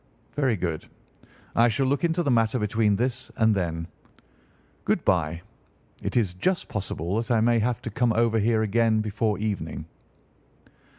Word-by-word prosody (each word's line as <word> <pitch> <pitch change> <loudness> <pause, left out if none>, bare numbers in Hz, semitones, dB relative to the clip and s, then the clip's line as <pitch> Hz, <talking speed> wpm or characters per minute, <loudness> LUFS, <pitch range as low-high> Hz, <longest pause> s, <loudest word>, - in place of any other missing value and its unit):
"Very 135 -6 +2
good. 85 -4 -3 0.7
I 115 +1 +5
shall 120 +4 +1
look 140 +5 0
into 170 +1 +1
the 140 - +1
matter 115 0 +2
between 105 -1 +1
this 125 +4 -2
and 110 -1 +4
then. 85 -4 -2 1.0
Good - - 0
bye; 85 +3 +1 0.6
it - - -2
is 100 -7 +1
just 175 - -1
possible 95 -2 -3
that 115 -1 -2
I 120 -2 +3
may 115 +1 +3
have 120 +1 -1
to 115 - -4
come 120 +2 +1
over 115 0 +2
here 110 +1 +2
again 110 +1 +2
before 105 0 -1
evening." 100 -8 -3
110 Hz, 160 wpm, -26 LUFS, 100-120 Hz, 1.0 s, I